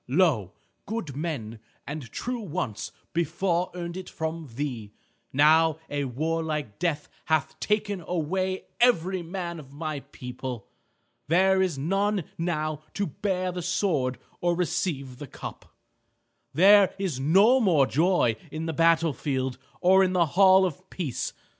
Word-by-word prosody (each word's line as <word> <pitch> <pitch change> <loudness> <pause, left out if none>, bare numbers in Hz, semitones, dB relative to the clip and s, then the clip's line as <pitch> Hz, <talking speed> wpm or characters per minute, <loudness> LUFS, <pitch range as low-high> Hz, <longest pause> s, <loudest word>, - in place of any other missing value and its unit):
Lo! 130 - +2 0.3
good 200 - -4
men 135 -8 -4 0.3
and 140 -5 -6
true 245 0 -3
once 175 - -4 0.2
before 170 +2 0
earned 170 -1 -5
it 185 0 -7
from 160 -3 -4
thee. 120 -7 -4 0.4
Now 155 +3 +5
a 145 -1 -1
warlike 155 -2 -2
death 160 -4 -1 0.2
hath 160 0 0
taken 205 -2 0
away 185 +3 -1 0.2
every 190 -7 +3
man 170 -1 -5
of 135 -3 -13
my 155 0 -4
people. 125 -3 -7 0.6
There 190 +4 +4
is 180 -6 0
none 195 +6 0 0.2
now 155 -3 -1
to 200 - 0
bear 185 +3 -2
the 180 0 -4
sword 145 -9 0 0.2
or 175 0 +1
receive 140 -7 -2
the 145 - -7
cup. - - -9 0.8
There 200 +3 +6
is 185 -9 -2
no 195 - +5
more 170 - +4
joy 155 - +2
in 155 +1 -5
the 160 - -2
battle 165 0 +3
field 130 -1 -2 0.2
or 190 +1 +6
in 185 -1 +1
the 175 -2 +4
hall 190 0 +6
of 185 +2 -5
peace. 155 -10 -3
165 Hz, 140 wpm, -26 LUFS, 145-185 Hz, 0.8 s, There